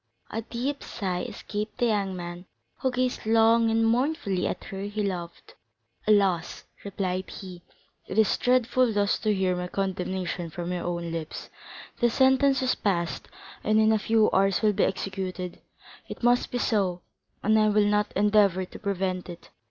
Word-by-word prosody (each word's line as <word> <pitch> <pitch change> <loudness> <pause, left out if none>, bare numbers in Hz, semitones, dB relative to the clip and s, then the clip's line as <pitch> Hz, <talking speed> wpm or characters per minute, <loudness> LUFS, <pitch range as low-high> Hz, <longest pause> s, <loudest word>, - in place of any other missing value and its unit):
A 225 - -2
deep 255 +5 -4
sigh 185 -5 -3
escaped 210 +3 -5
the 245 - +2
young 200 -4 0
man, 175 0 -7 0.3
who 260 - +1
gazed 255 0 -1
long 225 +1 +4
and 225 0 +2
mournfully 235 - +1
at - - -4
her 195 -2 -7
he 205 +1 -3
loved. 175 -4 -5 0.5
"Alas," 195 -5 +2 0.2
replied 185 -2 -3
he, 185 -3 -9 0.5
"it 190 - -5
is 220 -2 +4
dreadful 250 0 +2
thus 205 -1 +1
to 215 - +1
hear 190 -2 +1
my 180 0 -3
condemnation 185 -2 -3
from 175 +2 -5
your 175 - -3
own 170 -1 -3
lips. 165 -1 -6 0.5
The 240 - +4
sentence 265 +2 +3
is 255 - +2
passed, 170 -8 -2 0.4
and, 215 0 +3
in 220 0 +5
a 220 - +3
few 220 0 +3
hours, 195 +2 +2
will 210 -1 +4
be 200 - +2
executed; 185 -2 -4 0.5
it - - -8
must 245 +1 +3
be 245 - -2
so, 190 -7 0 0.4
and 220 +1 +4
I 215 0 +4
will 210 0 +3
not 210 0 +1
endeavor 200 -2 +3
to - - -12
prevent 185 -2 -2
it. 175 0 -11
200 Hz, 165 wpm, -26 LUFS, 185-225 Hz, 0.5 s, in